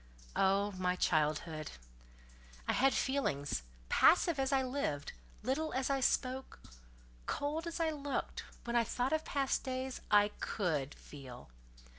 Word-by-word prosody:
Oh, 200 Hz, +2 st, +3 dB
my 180 Hz, 0 st, +1 dB
childhood! 155 Hz, -1 st, 0 dB, 1.0 s
I -, -, +2 dB
had 270 Hz, +1 st, +4 dB
feelings: 220 Hz, -, 0 dB, 0.3 s
passive 340 Hz, -, +5 dB
as 270 Hz, 0 st, +1 dB
I 270 Hz, -1 st, +3 dB
lived, 250 Hz, -, -2 dB, 0.3 s
little 280 Hz, +7 st, 0 dB
as 260 Hz, +2 st, 0 dB
I 275 Hz, -, +2 dB
spoke, 260 Hz, 0 st, 0 dB, 0.7 s
cold 310 Hz, +4 st, -1 dB
as 335 Hz, -, -4 dB
I 325 Hz, -1 st, +2 dB
looked, 285 Hz, -2 st, -3 dB, 0.2 s
when 235 Hz, 0 st, -3 dB
I 235 Hz, -, +5 dB
thought 250 Hz, +4 st, -1 dB
of 315 Hz, 0 st, +1 dB
past 275 Hz, -2 st, 0 dB
days, 260 Hz, 0 st, -3 dB
I 205 Hz, 0 st, +6 dB
could 150 Hz, -9 st, -1 dB
feel. 130 Hz, -, -11 dB
255 Hz, 135 wpm, -34 LUFS, 170-275 Hz, 1.0 s, I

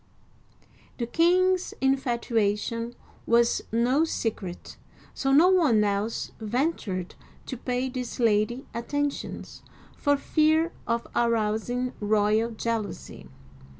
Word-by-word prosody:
The 235 Hz, -, -1 dB
king's 360 Hz, +7 st, +2 dB
infatuation 235 Hz, -3 st, 0 dB, 0.3 s
was 235 Hz, 0 st, +3 dB
no 245 Hz, +7 st, +3 dB
secret, 210 Hz, -, -4 dB, 0.4 s
so 270 Hz, -, -1 dB
no 315 Hz, +7 st, +6 dB
one 300 Hz, -, +4 dB
else 205 Hz, +2 st, -1 dB
ven 250 Hz, +9 st, 0 dB
tured 185 Hz, -, -5 dB, 0.3 s
to 260 Hz, -, -5 dB
pay 250 Hz, +1 st, -2 dB
this 250 Hz, -2 st, -5 dB
lady 230 Hz, +2 st, +2 dB
attentions, 285 Hz, +5 st, -3 dB, 0.3 s
for 285 Hz, -1 st, +2 dB
fear 315 Hz, +3 st, +2 dB, 0.2 s
of 230 Hz, 0 st, 0 dB
arousing 235 Hz, +2 st, 0 dB
royal 215 Hz, +2 st, +2 dB
jealousy. 225 Hz, -2 st, -4 dB
235 Hz, 100 wpm, -26 LUFS, 220-275 Hz, 0.4 s, no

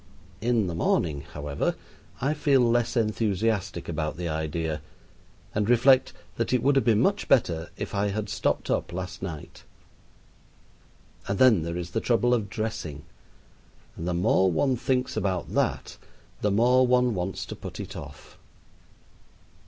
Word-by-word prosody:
In 115 Hz, -2 st, +2 dB
the 90 Hz, -, -3 dB
morning, 80 Hz, -3 st, 0 dB
however, 75 Hz, -1 st, -3 dB, 0.5 s
I 140 Hz, +4 st, +1 dB
feel 145 Hz, -3 st, +3 dB
less 120 Hz, 0 st, +2 dB
enthusiastic 105 Hz, -4 st, 0 dB
about 75 Hz, -1 st, -3 dB
the 90 Hz, -1 st, -3 dB
idea, 80 Hz, 0 st, -2 dB, 0.7 s
and 105 Hz, +1 st, 0 dB
reflect 130 Hz, +2 st, +5 dB, 0.3 s
that 115 Hz, -, -1 dB
it 125 Hz, -2 st, +2 dB
would 140 Hz, +1 st, +3 dB
have 135 Hz, -, +4 dB
been 110 Hz, -2 st, +4 dB
much 200 Hz, 0 st, +1 dB
better 85 Hz, -10 st, +2 dB
if -, -, -5 dB
I 100 Hz, 0 st, +1 dB
had 105 Hz, +1 st, -2 dB
stopped -, -, -1 dB
up -, -, -1 dB
last 95 Hz, +1 st, -6 dB
night. 85 Hz, -6 st, -7 dB, 1.6 s
And 100 Hz, -, -1 dB
then 120 Hz, -7 st, +6 dB
there 85 Hz, +2 st, -3 dB
is 90 Hz, 0 st, -5 dB
the -, -, -1 dB
trouble 120 Hz, 0 st, +2 dB
of 110 Hz, -5 st, 0 dB
dressing, 90 Hz, -9 st, -4 dB, 0.9 s
and 85 Hz, -, -5 dB
the 90 Hz, -, 0 dB
more 95 Hz, +1 st, +3 dB
one 130 Hz, -, +2 dB
thinks 125 Hz, +1 st, -1 dB
about 95 Hz, -3 st, -2 dB
that -, -, -1 dB, 0.4 s
the 105 Hz, -, +2 dB
more 125 Hz, +5 st, +4 dB
one 125 Hz, -1 st, +3 dB
wants 90 Hz, -1 st, -3 dB
to -, -, -7 dB
put -, -, -8 dB
it -, -, -7 dB
off. -, -, -11 dB
105 Hz, 155 wpm, -26 LUFS, 85-120 Hz, 1.6 s, then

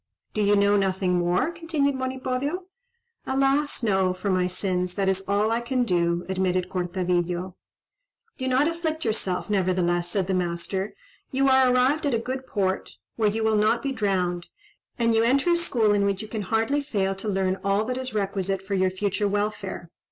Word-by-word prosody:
"Do 215 Hz, -, -1 dB
you 205 Hz, 0 st, +4 dB
know 200 Hz, 0 st, +4 dB
nothing 185 Hz, -2 st, +1 dB
more?" 175 Hz, -, +1 dB
continued 325 Hz, -4 st, 0 dB
Monipodio. 260 Hz, +5 st, -2 dB, 0.6 s
"Alas, 275 Hz, +1 st, +1 dB
no, 190 Hz, -4 st, +2 dB
for 195 Hz, +2 st, -2 dB
my 185 Hz, -1 st, +2 dB
sins, 180 Hz, -1 st, -1 dB
that 195 Hz, -2 st, 0 dB
is 190 Hz, 0 st, +1 dB
all 205 Hz, +2 st, +2 dB
I 230 Hz, +1 st, +1 dB
can 250 Hz, +1 st, 0 dB
do," 175 Hz, -4 st, 0 dB
admitted 185 Hz, -1 st, 0 dB
Cortadillo, 180 Hz, 0 st, -1 dB, 0.8 s
"Do 260 Hz, -, -2 dB
not 260 Hz, +3 st, +3 dB
afflict 325 Hz, -2 st, -2 dB
yourself, 195 Hz, -5 st, -1 dB
nevertheless," 180 Hz, -3 st, +1 dB
said 190 Hz, 0 st, 0 dB
the 190 Hz, -, -1 dB
master; 180 Hz, +2 st, -2 dB, 0.3 s
"you 270 Hz, 0 st, +2 dB
are 260 Hz, -1 st, +5 dB
arrived 270 Hz, +5 st, +2 dB
at 270 Hz, -, +1 dB
a -, -, +2 dB
good 260 Hz, +3 st, -5 dB
port, 190 Hz, -2 st, -2 dB, 0.2 s
where 220 Hz, -2 st, +2 dB
you 220 Hz, +2 st, -2 dB
will 220 Hz, 0 st, +2 dB
not 220 Hz, +3 st, +2 dB
be 275 Hz, -, -1 dB
drowned, 185 Hz, -7 st, -1 dB, 0.5 s
and 230 Hz, -2 st, +2 dB
you 225 Hz, -, +4 dB
enter 265 Hz, +8 st, +3 dB
a -, -, +5 dB
school 240 Hz, -11 st, +2 dB
in 205 Hz, -1 st, +2 dB
which 200 Hz, +1 st, -1 dB
you -, -, -7 dB
can 215 Hz, 0 st, -4 dB
hardly 225 Hz, +8 st, 0 dB
fail 200 Hz, -9 st, -1 dB
to 195 Hz, +3 st, -5 dB
learn 190 Hz, -1 st, 0 dB
all 200 Hz, +2 st, +1 dB
that 250 Hz, +2 st, -2 dB
is 260 Hz, 0 st, -4 dB
requisite 195 Hz, -2 st, -1 dB
for 200 Hz, +1 st, -4 dB
your 190 Hz, -1 st, +2 dB
future 200 Hz, +2 st, -1 dB
welfare. 205 Hz, -4 st, -3 dB
205 Hz, 185 wpm, -25 LUFS, 185-255 Hz, 0.8 s, are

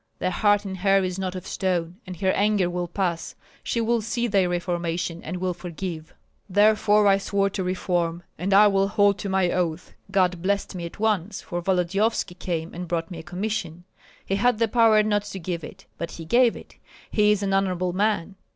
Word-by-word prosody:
The 185 Hz, -, -1 dB
heart 205 Hz, +2 st, +2 dB
in 195 Hz, -, -4 dB
her 195 Hz, +1 st, +2 dB
is 185 Hz, 0 st, -3 dB
not 190 Hz, -1 st, -3 dB
of 185 Hz, -, -6 dB
stone, 180 Hz, -2 st, -2 dB
and 185 Hz, -1 st, -7 dB
her 190 Hz, -1 st, +3 dB
anger 200 Hz, -3 st, +2 dB
will 175 Hz, 0 st, -2 dB
pass; 175 Hz, -2 st, -2 dB, 0.3 s
she 235 Hz, -, -2 dB
will 230 Hz, 0 st, +1 dB
see 235 Hz, +2 st, -2 dB
thy 200 Hz, -5 st, +2 dB
reformation 175 Hz, -1 st, -2 dB
and 180 Hz, +4 st, -4 dB
will 180 Hz, 0 st, -1 dB
forgive.' 170 Hz, -2 st, -7 dB, 0.3 s
Therefore 210 Hz, +1 st, +4 dB
I 195 Hz, -1 st, +5 dB
swore 200 Hz, 0 st, 0 dB
to 190 Hz, -, -3 dB
reform, 175 Hz, -2 st, -1 dB
and 190 Hz, +3 st, -3 dB
I 200 Hz, +2 st, +7 dB
will 195 Hz, -1 st, +3 dB
hold 205 Hz, -1 st, +3 dB
to 200 Hz, -, -4 dB
my 190 Hz, -2 st, +2 dB
oath. 175 Hz, -2 st, -2 dB, 0.2 s
God 185 Hz, -3 st, +1 dB
blessed 200 Hz, +2 st, -1 dB
me 175 Hz, -2 st, -5 dB
at 170 Hz, -, -14 dB
once, 210 Hz, -3 st, 0 dB
for 175 Hz, 0 st, -4 dB
Volodyovski 190 Hz, +3 st, 0 dB
came 170 Hz, -2 st, -4 dB
and 180 Hz, +1 st, -6 dB
brought 165 Hz, +1 st, -2 dB
me 170 Hz, -, -6 dB
a -, -, -6 dB
commission. 180 Hz, -1 st, -4 dB, 0.4 s
He 195 Hz, -, -1 dB
had 245 Hz, +2 st, +2 dB
the 230 Hz, 0 st, +2 dB
power 220 Hz, -2 st, +5 dB
not 205 Hz, -1 st, 0 dB
to 195 Hz, -2 st, -6 dB
give 170 Hz, -1 st, -4 dB
it; 190 Hz, +5 st, -11 dB
but 170 Hz, -, -3 dB
he 165 Hz, -, -8 dB
gave 240 Hz, +6 st, +3 dB
it, -, -, -14 dB, 0.3 s
he 210 Hz, -1 st, +4 dB
is 210 Hz, -1 st, +1 dB
an 195 Hz, -1 st, 0 dB
honorable 185 Hz, -2 st, 0 dB
man! 205 Hz, -2 st, 0 dB
190 Hz, 205 wpm, -24 LUFS, 175-205 Hz, 0.4 s, I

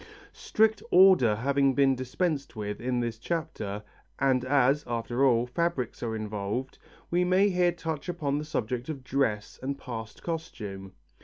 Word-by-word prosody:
Strict 220 Hz, 0 st, +1 dB
order 180 Hz, -, +6 dB
having 135 Hz, +3 st, +2 dB
been 135 Hz, -1 st, +4 dB
dispensed 135 Hz, +2 st, -2 dB
with 105 Hz, -1 st, -4 dB
in 125 Hz, 0 st, 0 dB
this 115 Hz, -1 st, -3 dB
chapter, 115 Hz, -10 st, -3 dB, 0.3 s
and 130 Hz, -2 st, +2 dB
as, 140 Hz, +2 st, +3 dB
after 120 Hz, +2 st, -1 dB
all, 120 Hz, -3 st, +4 dB
fabrics 135 Hz, -1 st, -2 dB
are 115 Hz, -2 st, -2 dB
involved, 110 Hz, +4 st, -4 dB, 0.3 s
we 175 Hz, +1 st, +3 dB
may 185 Hz, +3 st, +4 dB
here 180 Hz, -1 st, +3 dB
touch 160 Hz, -1 st, -5 dB
upon 150 Hz, -5 st, -1 dB
the -, -, -4 dB
subject 125 Hz, -2 st, -3 dB
of 140 Hz, -4 st, -5 dB
dress 125 Hz, -6 st, -1 dB
and 140 Hz, +2 st, -3 dB
past 115 Hz, -4 st, -8 dB
costumes. 105 Hz, -, -5 dB
130 Hz, 150 wpm, -28 LUFS, 115-160 Hz, 0.3 s, order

